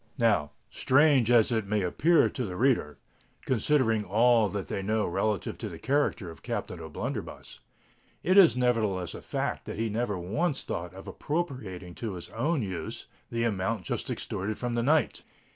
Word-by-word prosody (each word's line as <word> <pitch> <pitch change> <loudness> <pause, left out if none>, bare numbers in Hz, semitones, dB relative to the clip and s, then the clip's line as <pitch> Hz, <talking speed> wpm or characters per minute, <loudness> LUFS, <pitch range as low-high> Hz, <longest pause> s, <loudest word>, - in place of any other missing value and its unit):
Now, 105 -11 +2 0.2
strange 135 -3 +4
as 120 -1 +5
it 110 -3 0
may 105 -1 0
appear 160 - +3
to 130 - -4
the 95 -5 -4
reader,—considering 115 - 0
all 110 +2 +4
that 100 -1 -4
they 100 - -3
know 105 +1 0
relative 100 +2 -1
to - - -4
the - - -8
character 135 - 0
of 80 - -14
Captain 90 - -4
O'Blunderbuss,—it 80 - -6
is 185 -9 +7
nevertheless 110 -8 0
a - - -8
fact - - -3
that - - -6
he 115 0 -1
never 110 -2 -1
once 135 - -1
thought 85 +1 -5
of 95 +1 -10
appropriating 110 - -4
to 110 0 -5
his 85 - -8
own 135 +4 0
use 95 -3 -5 0.2
the 115 0 -1
amount 105 -2 -1
just - - -3
extorted 105 +3 -3
from 120 -1 -3
the 120 - +1
knight. 150 +4 +2
110 Hz, 160 wpm, -28 LUFS, 95-125 Hz, 0.2 s, is